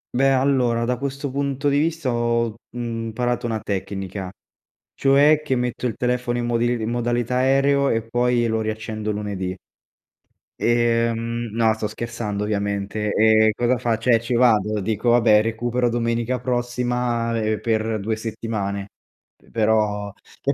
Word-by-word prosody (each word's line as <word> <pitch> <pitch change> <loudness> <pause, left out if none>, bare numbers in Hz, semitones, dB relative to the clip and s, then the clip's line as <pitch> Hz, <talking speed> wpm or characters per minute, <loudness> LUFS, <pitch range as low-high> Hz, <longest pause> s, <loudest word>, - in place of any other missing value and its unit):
Beh, 135 +2 +4
allora, 130 -3 +2
da 125 +1 0
questo 140 +2 -4
punto 140 +1 -2
di 140 0 +3
vista, 160 -2 0
ho, 115 -1 0 0.2
mhmm, 115 -2 -4
parato 120 +1 -1
una 110 -1 -2
tecnica, 95 -1 -4 0.6
cioè 145 +3 +4
che 135 -4 -1
metto 125 0 -2
il 115 - -1
telefono 125 0 -1
in 120 - -1
modil 120 0 +1
in 110 - -2
modalità 120 0 -1
aereo 135 +2 +3
e 115 0 +1
poi 120 +1 +1
lo 110 -1 0
riaccendo 110 0 -3
lunedì. 100 -3 -4 1.0
E, 115 0 +2
mhmm, 115 -1 -4
no, 110 -1 +3
sto 110 0 -4
scherzando 110 -2 -4
ovviamente. 100 0 -2
Ehm, 110 0 +5
cosa 120 +3 +1
faccio? 115 0 -1
Eh, 115 -2 +5
ci 120 +1 -2
vado, 110 -4 +3
dico: 110 +4 -1
"Vabbè, 115 -3 +5
recupero 120 +2 0
domenica 115 +1 -1
prossima, 120 -1 -1
ehm, 110 -1 0
per 110 -1 -1
2 110 +3 -1
settimane"; 105 -3 -4 0.5
pe - - -25
però 105 -2 +1 0.3
e 140 - +1
115 Hz, 150 wpm, -22 LUFS, 110-125 Hz, 1.0 s, Ehm